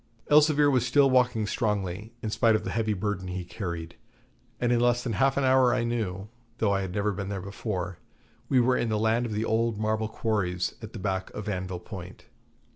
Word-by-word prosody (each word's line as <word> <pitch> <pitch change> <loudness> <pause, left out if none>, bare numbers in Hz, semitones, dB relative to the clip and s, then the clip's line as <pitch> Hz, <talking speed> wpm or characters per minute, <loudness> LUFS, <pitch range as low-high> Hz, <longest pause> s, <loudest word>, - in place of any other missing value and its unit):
Elzevir 150 -1 +5
was 130 -3 +3
still 135 +2 +4
walking 125 -4 +3
strongly, 105 -2 -2
in 110 - -2
spite 110 0 +3
of 110 - -1
the - - -4
heavy 110 -1 0
burden 100 -1 -3
he 90 0 -4
carried, 85 -2 -6 0.6
and 120 0 +1
in 120 - +3
less 120 0 +2
than 120 - -2
half 135 +4 +2
an 140 - +2
hour 130 -1 +4
I 120 - 0
knew, 105 -5 -2 0.3
though 105 -3 +1
I 100 - +1
had 95 -2 -4
never 105 +2 0
been 100 0 -4
there 100 -1 -3
before, 95 -2 -4 0.5
we 130 - +4
were 125 +1 +3
in 120 - 0
the 110 - +1
land 110 +3 +1
of - - -6
the 105 +2 -1
old 115 -1 +1
marble 110 +1 0
quarries 95 -6 -1
at 110 -1 -9
the - - -6
back 95 -2 -2
of 105 0 -6
Anvil 95 -3 -3
Point. 90 -2 -9
110 Hz, 210 wpm, -27 LUFS, 95-120 Hz, 0.6 s, Elzevir